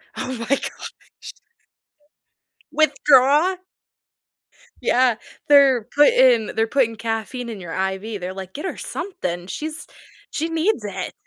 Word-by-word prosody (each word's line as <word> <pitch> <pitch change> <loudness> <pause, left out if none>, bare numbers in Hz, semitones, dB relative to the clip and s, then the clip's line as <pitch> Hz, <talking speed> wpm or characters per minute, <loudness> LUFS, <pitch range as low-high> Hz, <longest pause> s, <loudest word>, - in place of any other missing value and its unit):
Oh - - -4
my 230 - -4
gosh. 275 - -3 1.8
Withdraw? 295 +3 +4 1.3
Yeah, 250 -1 +3 0.3
they're 275 -5 +6
putting 255 -6 +5
they're 225 0 +1
putting 230 -3 +1
caffeine 225 +2 -4
in 220 -3 -7
your 165 -2 -7
IV, 190 +3 -3
they're 180 +1 -5
like, 190 -1 -9
"Get 300 - -6
her - - -4
something, 175 - -5
she's 310 - -6 0.4
she 320 +2 -2
needs 330 - 0
it." 195 -3 -5
245 Hz, 115 wpm, -21 LUFS, 205-290 Hz, 1.8 s, they're